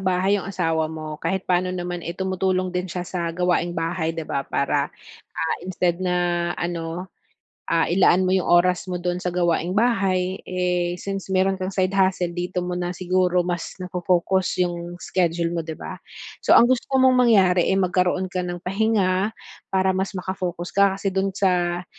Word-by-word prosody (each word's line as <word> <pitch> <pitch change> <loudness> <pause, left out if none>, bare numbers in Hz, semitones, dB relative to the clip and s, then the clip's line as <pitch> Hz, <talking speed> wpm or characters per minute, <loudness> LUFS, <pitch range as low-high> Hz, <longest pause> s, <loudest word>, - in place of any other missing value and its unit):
bahay, 190 +2 +1
'yung 190 - -7
asawa 165 -4 0
mo 155 -1 -7
kahit 190 -1 -1
pa'no 180 0 +1
naman, 175 -1 -4
eh, 170 +1 -6
tumutulong 185 -1 0
din 180 +1 -2
siya 180 +1 -4
sa 175 -2 -3
gawaing 175 0 0
bahay, 165 0 -2
'di 165 - -3
ba, 140 - -2
para, 140 +1 0 0.4
ah, 160 - -2
instead 180 -1 -1
na 175 -1 0
ano, 170 +1 -3 0.6
ah, 165 -1 +3
ilaan 185 +1 +4
mo 185 - +2
'yung 190 -1 +1
oras 180 +1 +3
mo 180 - -2
do'n 175 0 -2
sa 180 - -1
gawaing 175 +1 0
bahay, 195 -5 +1
eh, 180 -1 -1
since 195 +1 -5
meron 190 0 +2
kang 185 - -1
side 190 0 0
hustle, 185 -2 +1
dito 180 +1 -3
mo 180 - -3
na 180 0 -3
siguro 180 -1 +1
mas 175 -1 -4
nafo-focus 180 0 0
'yung 175 0 -5
schedule 170 -2 0
mo, 170 - -1
'di 160 -1 -7
ba? - - -8 0.4
So, - - +6
ang - - +7
gusto 255 +2 +1
mong 260 0 +5 0.2
mangyari, 185 -5 +4
eh, 190 - +2
magkaroon 185 0 +1
ka 185 0 -3
ng 175 0 -4
pahinga, 195 -1 +1 0.4
para 190 0 +2
mas 190 +1 -2
maka-focus 180 -2 -4
ka, 200 -1 +3
kasi 195 -1 -2
do'n 195 +1 +1
sa, 180 -2 0
180 Hz, 175 wpm, -23 LUFS, 175-190 Hz, 0.6 s, ang